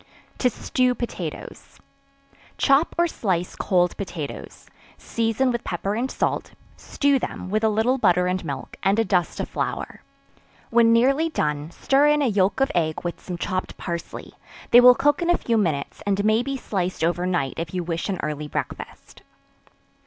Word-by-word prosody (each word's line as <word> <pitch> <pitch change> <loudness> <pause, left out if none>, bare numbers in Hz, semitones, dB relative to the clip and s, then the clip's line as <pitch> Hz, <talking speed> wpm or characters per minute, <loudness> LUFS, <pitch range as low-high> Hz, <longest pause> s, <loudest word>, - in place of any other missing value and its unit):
To 250 - +3
Stew 250 +2 0
Potatoes. 240 - -7 0.8
Chop 275 +4 +3
or 345 - +4
slice 185 - -2
cold 180 -3 +1
potatoes; 175 -7 -7 0.3
season 230 +3 0
with 235 -1 -3
pepper 190 +3 -3
and 240 +5 -1
salt; - - -2 0.2
stew 280 -1 +1
them, 185 - -5
with 215 +1 0
a 220 - +4
little 225 +5 +1
butter 180 -4 +3
and 185 0 -1
milk, 140 -4 -6
and 195 +2 +2
a 225 - +2
dust 180 -4 0
of - - -2
flour; - - -4 0.7
when 230 -1 +5
nearly 270 +8 +3
done, 150 - -2
stir 275 +11 +2
in 295 0 +3
a - - +2
yelk 195 +5 +1
of 270 - +2
egg 160 -3 -1
with 175 -1 -4
some 180 -2 -6
chopped 185 +1 -3
parsley 170 -2 -6 0.4
they 240 - +9
will 250 0 +8
cook 290 +4 +2
in 345 - 0
a 350 - +4
few 230 - -1
minutes, 160 -10 -1
and 200 0 +1
may 215 +2 +3
be 275 +2 -3
sliced 185 -8 -3
over 175 +2 0
night 155 -8 0
if 165 -1 -4
you 180 -1 -2
wish 165 +2 -3
an 190 - -2
early 150 0 -3
breakfast. - - -7
200 Hz, 175 wpm, -23 LUFS, 175-250 Hz, 0.8 s, they